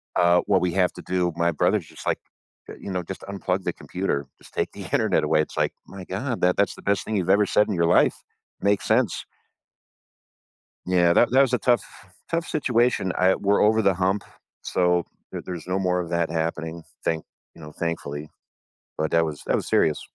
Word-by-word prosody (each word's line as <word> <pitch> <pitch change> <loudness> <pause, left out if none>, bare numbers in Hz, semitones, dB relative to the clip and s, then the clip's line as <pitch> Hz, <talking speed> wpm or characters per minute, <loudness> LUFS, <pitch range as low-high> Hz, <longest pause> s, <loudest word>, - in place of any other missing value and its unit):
"Uh, 85 0 +4
what 95 -3 +3
we 90 - +1
have 90 -2 +2
to - - -10
do" 90 -1 0
my 85 0 +2
brother's 75 - +1
just - - -12
like, - - +2 0.6
"You 100 - -6
know, 90 -1 -2
just 95 +3 -7
unplug 95 -1 -2
the - - -1
computer, 90 -7 -2 0.2
just - - -16
take - - -1
the - - -8
internet - - +2
away," 75 - +3
it's - - -5
like, - - +1
"My 95 -1 -9
god, 115 +6 -3
that 90 0 +3
that's 100 - +2
the - - -13
best 100 -1 0
thing 110 - -2
you've 90 0 -1
ever 100 +2 +5
said 105 - +3
in 100 - 0
your 85 -1 +2
life. - - +2 0.5
Makes 100 -1 +1
sense." - - +1 1.6
Yeah, 90 -2 +4
that 120 - +4
that 130 - +5
was 135 -2 +3
a 125 - +3
tough 120 -4 +2 0.5
tough 170 0 -1
situation, 120 - +1
I 95 +1 +4
we're 100 0 +2
over 110 +1 +4
the 95 -2 +3
hump, 95 +3 0 0.4
so 90 -1 +1 0.3
there - - -6
there's 90 -3 -6
no 95 +1 0
more 90 -1 +1
of 85 -1 -5
that 85 -2 0
happening, 80 0 -3 0.2
thank 80 -1 -1 0.3
you - - -15
know, 75 0 -9
thankfully. 75 -3 -4 0.7
But 80 0 -1
that 85 0 +4
was 75 -2 -5
that - - +2
was - - -3
serious. 75 - +2
90 Hz, 205 wpm, -24 LUFS, 85-100 Hz, 1.6 s, ever